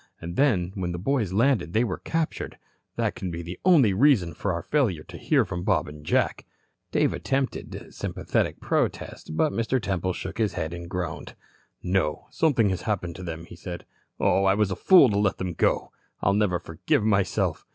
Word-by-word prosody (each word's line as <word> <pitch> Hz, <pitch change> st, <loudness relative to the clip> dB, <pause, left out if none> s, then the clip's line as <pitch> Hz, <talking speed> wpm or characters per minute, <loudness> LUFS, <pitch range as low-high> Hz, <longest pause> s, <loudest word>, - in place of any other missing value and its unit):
And 85 Hz, +1 st, -6 dB
then 95 Hz, -11 st, +2 dB
when 90 Hz, -3 st, -3 dB
the -, -, -3 dB
boys 110 Hz, 0 st, 0 dB
landed 105 Hz, -, +2 dB
they 115 Hz, -, +3 dB
were 100 Hz, -7 st, -3 dB
captured. 165 Hz, -1 st, -3 dB, 0.4 s
That -, -, 0 dB
can 95 Hz, -, -5 dB
be 85 Hz, 0 st, -5 dB
the 90 Hz, +2 st, -7 dB
only 150 Hz, -, +5 dB
reason 105 Hz, -, +3 dB
for 100 Hz, +5 st, -2 dB
our 85 Hz, -1 st, -3 dB
failure 110 Hz, -, +1 dB
to -, -, -12 dB
hear -, -, +2 dB
from 90 Hz, -, -4 dB
Bob 95 Hz, -2 st, +1 dB
and 75 Hz, 0 st, -10 dB
Jack." -, -, 0 dB, 0.4 s
Dave -, -, +2 dB
attempted 135 Hz, -1 st, -3 dB
sympathetic -, -, -2 dB
protest, 80 Hz, -, -2 dB
but 155 Hz, -, +2 dB
Mr. 115 Hz, +3 st, 0 dB
Temple 95 Hz, -4 st, -1 dB
shook -, -, -6 dB
his 110 Hz, -3 st, +1 dB
head 80 Hz, +2 st, -3 dB
and 85 Hz, 0 st, -7 dB
groaned. 90 Hz, -3 st, -4 dB, 0.5 s
"No, 90 Hz, -5 st, 0 dB
something 125 Hz, -10 st, +2 dB
has 95 Hz, -1 st, -2 dB
happened 90 Hz, -6 st, -2 dB
to -, -, -8 dB
them," 85 Hz, -1 st, -6 dB
he 85 Hz, -, -12 dB
said. 85 Hz, 0 st, -7 dB, 0.3 s
"Oh, 95 Hz, -, +3 dB
I 95 Hz, 0 st, +4 dB
was 105 Hz, -2 st, +1 dB
a -, -, -1 dB
fool 180 Hz, -8 st, +7 dB
to 100 Hz, -, +1 dB
let 100 Hz, -2 st, +1 dB
them 90 Hz, -2 st, -3 dB
go. -, -, +1 dB, 0.3 s
I'll 100 Hz, -, +3 dB
never 100 Hz, -3 st, +2 dB
forgive 85 Hz, +4 st, -1 dB
myself. 100 Hz, -3 st, +1 dB
95 Hz, 195 wpm, -26 LUFS, 85-115 Hz, 0.5 s, fool